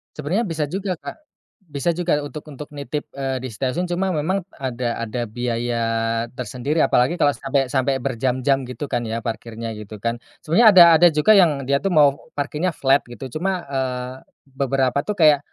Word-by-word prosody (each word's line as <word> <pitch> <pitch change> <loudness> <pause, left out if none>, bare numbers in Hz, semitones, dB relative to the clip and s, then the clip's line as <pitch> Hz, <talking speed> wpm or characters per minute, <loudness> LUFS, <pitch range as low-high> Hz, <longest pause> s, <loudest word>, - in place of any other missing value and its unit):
Sebenarnya 170 +10 -1
bisa 165 -5 -2
juga 190 +2 -2
Kak. - - -9 0.5
Bisa 150 -1 -3
juga 170 -3 +1
untuk 145 +1 -7
untuk 145 +1 -9
nitip, 145 +1 -5
eee, 135 -1 -2
di 130 - -5
stasiun 135 +10 -2
cuma 185 +2 0
memang 180 +5 -1
ada 125 -3 -3
ada 115 +1 -3
biaya 120 +1 -2 0.5
tersendiri 125 +6 -1
apalagi 135 +4 +2
kalau 145 -4 +3
sampai 135 0 0
sampai 135 0 +1
berjam-jam 130 +1 0
gitu 130 +3 -5
kan 120 - 0
ya 115 +1 -4
parkirnya 115 0 -5
gitukan. 110 +2 -5 0.2
Sebenarnya 190 +9 +4
ada 180 - +11 0.2
ada 175 - +8
juga 155 +6 +3
yang 165 -9 +4
dia 140 +1 +2
itu 195 - -1
mau 145 -5 +3
parkirnya 150 +5 -1
flat 135 +1 +3
gitu 120 +3 -8
cuma, 185 0 -1
eee, 130 -2 -3 0.4
beberapa 135 0 0
tuh 210 - -1
kayak, 155 -5 +5
140 Hz, 170 wpm, -21 LUFS, 125-160 Hz, 0.5 s, ada